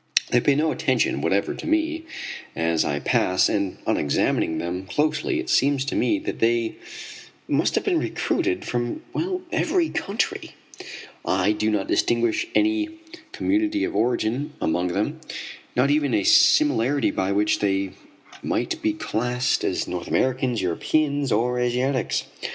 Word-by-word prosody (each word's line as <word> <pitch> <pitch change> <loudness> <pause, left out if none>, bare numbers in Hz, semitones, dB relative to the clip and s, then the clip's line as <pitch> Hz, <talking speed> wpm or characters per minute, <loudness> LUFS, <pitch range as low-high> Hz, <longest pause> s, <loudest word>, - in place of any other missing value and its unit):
They 125 - +4
pay 140 - +3
no 155 +2 +2
attention - - 0
whatever - - +1
to - - -7
me 320 +1 0 0.5
as 80 -1 +1
I 70 - -1
pass, 90 0 +2
and 100 -2 -1
on - - +1
examining 75 +2 +1
them 90 +3 -4
closely 150 - 0
it 340 - -4
seems 140 -1 +2
to 135 - -3
me 315 - +2
that 305 - -5
they 115 0 +1 0.7
must - - +1
have - - +1
been 365 -5 +1
recruited 360 +2 -1
from 120 -1 -3 0.5
every 345 -4 +1
country. 200 +4 -2 0.7
I 95 +2 +2
do 105 0 0
not 105 -3 0
distinguish 120 -1 +1
any 320 0 +2 0.4
community 315 -3 0
of - - -2
origin 120 +6 0
among 90 +3 0
them, 85 - -2 0.6
not 130 +3 +3
even 145 -5 +2
a 105 - +1
similarity 140 - +4
by 95 +1 -1
which 105 +1 +2
they 95 -1 0 0.5
might - - -2
be 110 - +1
classed 125 +4 -1
as - - -1
North 90 -1 -4
Americans, 130 -4 0
Europeans 140 - 0
or 125 +3 +1
Asiatics. 125 +2 0
125 Hz, 145 wpm, -24 LUFS, 105-155 Hz, 0.7 s, They